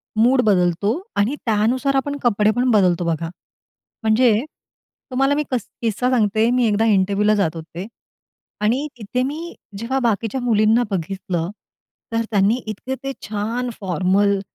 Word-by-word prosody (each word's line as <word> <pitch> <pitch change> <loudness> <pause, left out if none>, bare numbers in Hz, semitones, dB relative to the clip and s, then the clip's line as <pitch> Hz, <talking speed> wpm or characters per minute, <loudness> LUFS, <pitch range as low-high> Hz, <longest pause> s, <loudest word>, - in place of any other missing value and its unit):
Mood 250 +4 +4
बदलतो 180 0 +2 0.3
आणि 230 +8 +2
त्यानुसार 240 +6 +1
आपण 285 +2 0
कपडे 215 -2 +3
पण 250 +1 +2
बदलतो, 180 -4 +3
बघा. 165 0 -1 0.7
म्हणजे 220 +3 +4 0.8
तुम्हाला 270 +3 +2
मी 300 - 0
कस 250 - -1
किस्सा 230 +2 0
सांगते. 220 -2 +2
मी 250 -1 +2
एकदा 215 +2 +2
इंटरव्यूला 205 0 +3
जात 170 -5 0
होते, 165 +3 -7 0.8
आणि 250 +8 +1
तिथे 235 +4 -2
मी 315 +6 -4 0.2
जेव्हा 255 +5 -1
बाकीच्या 230 +3 -1
मुलींना 225 0 +3
बघितलं, 180 -1 -2 0.6
तर 230 - +1
त्यांनी 205 +3 +3
इतके 230 +5 -4
ते 275 - -2 0.2
छान 225 +4 -2
फॉर्मल 195 +2 +1
215 Hz, 135 wpm, -21 LUFS, 200-250 Hz, 0.8 s, Mood